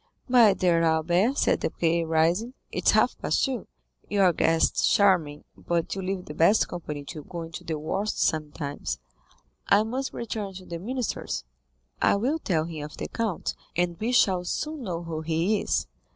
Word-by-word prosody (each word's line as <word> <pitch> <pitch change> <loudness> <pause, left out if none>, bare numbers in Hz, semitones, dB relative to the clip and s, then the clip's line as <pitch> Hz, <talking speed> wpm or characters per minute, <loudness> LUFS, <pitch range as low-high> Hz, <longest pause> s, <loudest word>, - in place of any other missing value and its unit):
"My 235 -6 +6
dear 175 -3 +2
Albert," 175 - +2
said - - +2
Debray, 170 0 0
rising, 165 +10 +1 0.2
"it - - -4
is - - +8
half - - +3
past - - +1
two. 255 -7 -4 0.4
Your 195 -3 +4
guest 165 +1 +2
is - - +3
charming, 180 -8 +3
but 170 -1 -2
you 195 - -4
leave 185 0 -3
the 150 - -7
best 170 +8 +4
company 150 -4 -6
to 150 +1 -8
go 170 0 -6
into 165 0 -8
the 160 -2 -3
worst 195 +8 -2
sometimes. 150 - -2 0.7
I 200 +2 +5
must 255 +5 -3
return 210 -4 -5
to 185 0 -9
the 170 -1 -6
minister's. 245 +5 -3 0.6
I - - +4
will 260 +10 0
tell 160 - 0
him 160 -3 -6
of 150 - -9
the - - -5
count, 225 -7 -2 0.2
and 175 0 +1
we 225 +3 -1
shall 190 -7 +3
soon 305 - -3
know 175 -3 -3
who 160 -2 -4
he 165 +6 +1
is." - - 0
175 Hz, 180 wpm, -26 LUFS, 160-210 Hz, 0.7 s, is